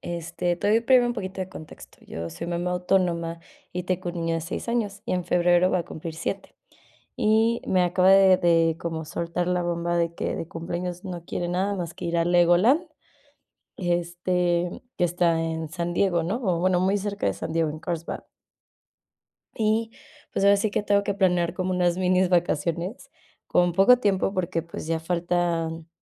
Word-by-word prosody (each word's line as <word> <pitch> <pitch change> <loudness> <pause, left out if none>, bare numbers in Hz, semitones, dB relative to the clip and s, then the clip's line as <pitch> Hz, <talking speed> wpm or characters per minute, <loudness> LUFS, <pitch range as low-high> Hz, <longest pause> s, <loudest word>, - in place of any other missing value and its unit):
este, 175 +1 -3
te 205 - -1
doy 225 - +4
primero 245 +1 +4
un - - 0
poquito 190 -4 -5
de 185 - -3
contexto. 160 -4 -12
Yo 85 0 -6
soy 85 - -6
mamá 175 +1 -2
autónoma, 175 -2 0 0.3
y 180 - -3
tengo 185 0 -2
un 175 - -11
niño 165 -1 -1
de 165 - -1
6 165 +8 -6
años, 210 -4 -2
y - - -3
en 180 -1 -1
febrero 175 +1 +3
va 185 - +2
a - - -1
cumplir 160 +1 -7
7. 195 +4 -5 0.6
Y 220 +2 +2
me 185 -1 +3
acaba 180 +1 +3
de 195 -1 +7
de 165 -2 +3
como 160 -1 -4
soltar 170 +3 -3
la 180 -1 +1
bomba 170 0 -1
de 170 0 0
que - - -3
de 165 - -5
cumpleaños 175 +2 -5
no 175 -3 -6
quiere 175 0 -3
nada 190 +3 0
más 170 -3 -5
que 175 - -6
ir 170 0 -1
a 165 - +2
Legoland, 175 - +4 0.9
este, 175 0 -1 0.2
que - - +1
está 170 -1 +1
en 160 -1 -3
San 175 0 -3
Diego, 175 -2 +2
¿no?, 190 +8 -1
o 180 -5 +1
bueno, 180 0 +2
muy 190 +2 +2
cerca 205 0 -3
de - - +1
San - - -6
Diego, 165 -1 +1
en 155 +1 -7
Carlsbad. 170 0 -4 1.3
Y, 220 +1 0 0.4
pues, - - 0
ahora 200 0 +6
sí 205 +1 0
que 205 - -1
tengo 205 0 +2
que 200 - -1
planear 180 -3 +2
como 185 0 -2
unas 180 -1 +1
minis 185 0 +2
vacaciones, 175 - -1 0.4
con 175 0 +2
poco 195 +8 +6
tiempo, 195 -4 +1
porque, 170 -3 -1
pues, 165 -1 -8
ya 165 0 0
faltan, 170 -1 -1
175 Hz, 190 wpm, -25 LUFS, 170-190 Hz, 1.3 s, de